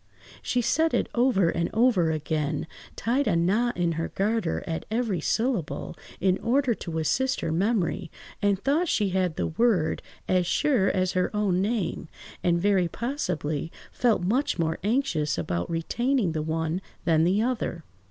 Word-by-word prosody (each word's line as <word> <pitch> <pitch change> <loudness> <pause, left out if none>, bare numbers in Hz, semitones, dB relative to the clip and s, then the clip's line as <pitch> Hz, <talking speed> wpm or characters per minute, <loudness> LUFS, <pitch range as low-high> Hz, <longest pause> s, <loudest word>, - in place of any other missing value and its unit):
She 245 -1 0
said 320 +7 +2
it - - +1
over 235 -8 +3
and 170 0 -1
over 220 -8 +4
again, 155 -1 -1 0.3
tied 255 +6 0
a 190 - +2
knot 210 +9 +1
in 175 -1 +1
her 165 0 -2
garter 205 -3 -1
at 160 -1 -3
every 220 -6 -1
syllable, 225 - -1 0.2
in 185 0 +2
order 255 +1 +2
to 170 -6 -5
assist 260 - 0
her 165 - -1
memory, 190 -1 0 0.3
and 205 -1 +3
thought 290 - +1
she 210 -9 +1
had 185 -3 0
the - - -1
word 185 -3 +1 0.3
as 180 -2 +2
sure 260 - +2
as 185 -1 +1
her 180 0 +1
own 195 -3 +1
name, 200 -6 -1 0.4
and 170 -1 +2
very 190 -1 +3
possibly 165 - -3 0.2
felt 230 -7 +1
much 245 +10 +1
more 160 -2 -1
anxious 200 - 0
about 85 0 -2
retaining 230 +6 0
the 155 -1 -2
one 160 +3 -2 0.2
than 160 -1 +4
the 190 +6 +2
other. 230 -9 -2
190 Hz, 160 wpm, -26 LUFS, 165-235 Hz, 0.4 s, over